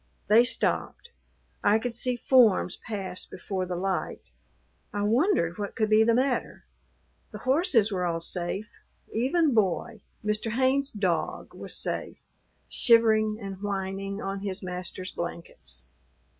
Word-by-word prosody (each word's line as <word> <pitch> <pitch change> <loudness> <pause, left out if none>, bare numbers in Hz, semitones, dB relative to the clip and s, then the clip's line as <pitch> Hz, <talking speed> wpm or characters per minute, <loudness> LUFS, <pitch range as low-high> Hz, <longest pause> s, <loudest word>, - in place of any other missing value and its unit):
They 225 +3 +7
stopped. 470 - 0 0.5
I 205 +1 +5
could 235 +1 -3
see 245 +1 0
forms 235 -7 +4
pass 195 -4 -4
before 185 0 -4
the 180 - -3
light. 185 - -3 0.6
I 205 - -2
wondered 215 - +2
what 205 -1 -4
could 215 -1 0
be 215 +1 +6
the 230 0 +3
matter. 255 +1 -1 0.6
The - - -8
horses 255 - +2
were 185 -2 -1
all 170 -2 0
safe; 180 +5 -4 0.3
even 275 +6 +2
Boy, 215 +1 0 0.2
Mr. 215 +1 0
Haynes's 265 +3 +2
dog, 190 -5 -2
was - - -5
safe, - - -3 0.5
shivering 220 -2 +4
and 195 -2 -7
whining 195 0 -3
on 195 -1 -3
his 195 -1 -5
master's 180 0 -5
blankets. 70 - -7
210 Hz, 130 wpm, -27 LUFS, 185-235 Hz, 0.6 s, They